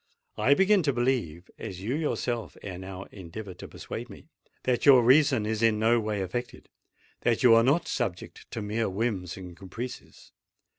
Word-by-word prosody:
I 140 - +5
begin 195 +2 +4
to 145 -4 +1
believe—as 95 -7 -3
you 110 +6 -2
yourself 120 - -2
ere 90 -3 -6
now 95 0 -7
endeavoured 95 0 -9
to - - -8
persuade - - -7
me—that 125 -1 -5
your 130 -4 +7
reason 130 -3 +4
is 110 0 -2
in 115 -2 +3
no 115 +2 +3
way 105 -3 -2
affected—that 120 +2 -5
you 120 -2 +8
are 115 - +7
not 140 +8 +2
subject 100 -9 -4
to 110 - -5
mere 110 +1 -1
whims 95 -3 -2
and 90 -2 -9
caprices. 110 +7 -9
110 Hz, 155 wpm, -27 LUFS, 95-125 Hz, -, you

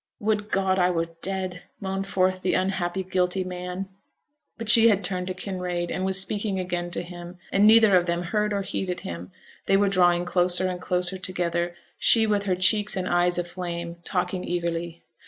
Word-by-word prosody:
'Would 210 0 -1
God 190 -1 +1
I 180 0 +3
were 165 -1 -1
dead!' 185 -2 -3 0.2
moaned 195 0 -4
forth 185 -1 0
the 185 - 0
unhappy, 185 0 -1
guilty 185 0 -1
man. 180 +1 -6 0.7
But 230 -2 -6
she 230 +1 +8
had 200 -2 +1
turned 180 0 -2
to 185 - -4
Kinraid, 180 -2 -4
and 185 - -3
was 190 0 +4
speaking 200 0 0
again 175 -1 -3
to 175 - -4
him, 175 0 -10
and 205 +2 +4
neither 220 -2 +6
of 175 -1 +3
them 170 +1 -1
heard 210 +4 -1
or 200 -1 -1
heeded 185 -2 -4
him 85 +1 -7 0.4
they 195 - +4
were 200 0 +2
drawing 175 -2 +3
closer 180 +1 +2
and 180 -1 -4
closer 180 +1 0
together 175 -2 -2 0.2
she, 225 -1 +4
with 205 -2 0
her 185 -2 +1
cheeks 205 +3 +2
and 185 - -2
eyes 175 0 +2
aflame, 175 -1 -5
talking 180 0 -2
eagerly. 170 -1 -3
185 Hz, 185 wpm, -25 LUFS, 175-195 Hz, 0.7 s, she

